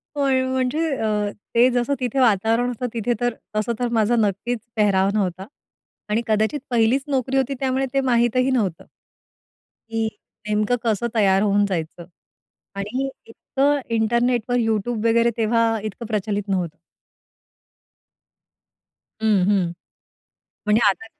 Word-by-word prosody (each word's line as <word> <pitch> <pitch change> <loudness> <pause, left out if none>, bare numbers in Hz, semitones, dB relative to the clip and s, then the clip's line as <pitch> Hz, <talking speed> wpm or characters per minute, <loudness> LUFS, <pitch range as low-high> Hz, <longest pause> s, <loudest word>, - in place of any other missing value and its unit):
होय, 270 -2 +2
म्हणजे 260 +5 0
अ, 210 -2 0 0.2
ते 240 +2 +6
जसं 245 +2 0
तिथे 250 +1 -1
वातावरण 230 +1 +2
जसं 250 +2 -3
तिथे 235 +1 0
तर 245 -1 +1 0.2
तसं 215 +3 0
तर 245 - 0
माझा 220 +3 +2
नक्कीच 220 +2 0 0.2
पेहराव 195 -3 +3
नव्हता. 190 -2 -2 0.6
आणि 215 +2 +1
कदाचित 220 +6 +1
पहिलीच 240 +2 +2
नोकरी 270 -1 0
होती. 270 +1 +1
त्यामुळे 265 0 0
ते 275 - +2
माहितही 240 +2 +2
नव्हतं 205 -10 -1 1.0
की 225 0 -1 0.4
नेमकं 210 +3 +1
कसं 225 +1 +1
तयार 195 -3 +4
होऊन 205 0 +3
जायचं. 170 -3 -4 0.7
आणि 235 +7 -2 0.2
इतकं 280 +5 0 0.2
इंटरनेटवर, 235 +2 +1
YouTube 225 0 -1
वगैरे 235 +1 +3
तेव्हा 230 +1 +2 0.2
इतकं 215 +3 -6
प्रचलित 210 -2 -2
नव्हतं. 180 -4 -1 2.4
हं, 215 -4 +3
हं. 190 -4 +2 1.0
म्हणजे 210 +2 +4
आता 195 +3 -2
225 Hz, 125 wpm, -22 LUFS, 210-245 Hz, 2.4 s, ते